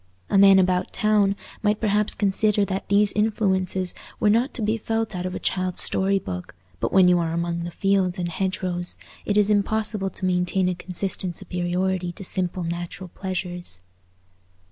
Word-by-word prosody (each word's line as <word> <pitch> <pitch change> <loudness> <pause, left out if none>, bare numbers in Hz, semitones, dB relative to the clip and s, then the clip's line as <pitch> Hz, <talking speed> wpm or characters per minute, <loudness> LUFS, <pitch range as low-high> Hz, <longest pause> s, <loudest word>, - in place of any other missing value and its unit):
A - - +4
man 195 -1 +8
about 185 -1 +2
town 210 -2 +2 0.3
might 210 -1 +1
perhaps 210 -1 +1
consider 205 +1 +2
that 190 0 -4
these 200 0 +4
influences 190 -4 0 0.3
were 210 -2 +4
not 235 +6 +2
to 230 - -2
be 215 +2 +1
felt 225 -1 -2
out 180 0 -2
of 185 - -5
a - - -3
child's 185 -1 -1
story 195 +1 +1
book; 90 - -6 0.2
but - - -1
when 190 -1 +6
you 180 -1 +5
are 165 -1 -1
among 170 0 -2
the - - -4
fields 190 0 +1
and 175 -1 -2
hedgerows, 180 0 -2 0.3
it 205 - +1
is 210 0 +4
impossible 210 -1 0
to 185 - -5
maintain 180 +1 +1
a 180 - +1
consistent 180 0 -3
superiority 180 0 -1
to 195 - -9
simple 180 -1 -2
natural 175 +2 -5
pleasures. 180 - -5
190 Hz, 170 wpm, -24 LUFS, 180-205 Hz, 0.3 s, man